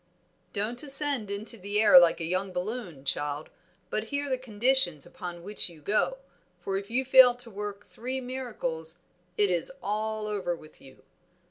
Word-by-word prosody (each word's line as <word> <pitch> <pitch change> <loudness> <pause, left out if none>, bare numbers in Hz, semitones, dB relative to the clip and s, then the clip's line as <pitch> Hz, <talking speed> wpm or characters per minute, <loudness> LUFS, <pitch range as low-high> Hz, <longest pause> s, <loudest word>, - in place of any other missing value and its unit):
"Don't 220 +4 -1
ascend 275 -6 +3
into 210 +3 -4
the 205 +2 -1
air 215 -4 +9
like 170 -1 +4
a - - -4
young 185 +3 -1
balloon, 180 - -5
child, 145 +2 -2 0.4
but 215 - -1
hear 285 +4 -2
the 260 - +1
conditions 230 - +2
upon 175 -1 -8
which 205 0 0
you 165 -2 -15
go, 210 - 0 0.4
for 195 - -3
if 195 +1 -4
you 260 +3 0
fail 255 -1 +8
to 245 -1 -13
work 205 0 -6
three 255 +3 -5
miracles 215 -11 -4 0.4
it 205 -2 +3
is 175 +6 0
all 215 +1 -2
over 200 -4 -2
with 155 -2 -16
you. 135 -1 -16
210 Hz, 165 wpm, -28 LUFS, 175-245 Hz, 0.4 s, air